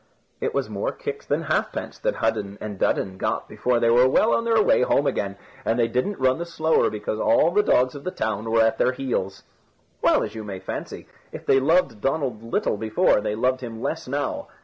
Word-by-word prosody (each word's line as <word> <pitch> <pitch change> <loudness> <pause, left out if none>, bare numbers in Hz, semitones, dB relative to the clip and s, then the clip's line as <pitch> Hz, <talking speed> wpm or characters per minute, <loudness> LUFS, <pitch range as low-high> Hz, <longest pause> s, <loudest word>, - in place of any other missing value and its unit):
It - - -2
was - - 0
more - - -2
kicks 445 0 -6
than - - 0
halfpence - - -2
that - - -1
Hudden 100 0 -1
and 105 -3 -6
Dudden 95 -1 0
got - - -2
before 125 -1 0
they 115 0 +3
were 125 +2 +6
well 215 +11 +3
on 230 - +1
their 225 -1 +3
way 210 - +4
home 140 +3 +2
again, 100 -7 -1 0.3
and 115 - 0
they 120 -1 +3
didn't 125 - -1
run 130 +2 +2
the 170 - -3
slower 160 -1 +2
because 105 0 -4
all 165 - +3
the 205 +4 +4
dogs 130 -10 +2
of 140 -1 -9
the - - -2
town 110 - -3
were 115 0 +4
at 110 - +1
their 130 - +3
heels. 110 -8 -3 0.6
Well, - - +3
as - - -5
you 110 -1 -6
may 100 -2 -6
fancy, 95 - -7 0.2
if - - -9
they 135 - +4
loved 140 - +2
Donald 135 -6 -1
little 115 -2 -1
before, 110 -1 +2
they 105 0 -2
loved 130 +3 0
him 115 -3 -7
less 160 +6 -3
now. 140 +2 -3
125 Hz, 215 wpm, -24 LUFS, 110-155 Hz, 0.6 s, were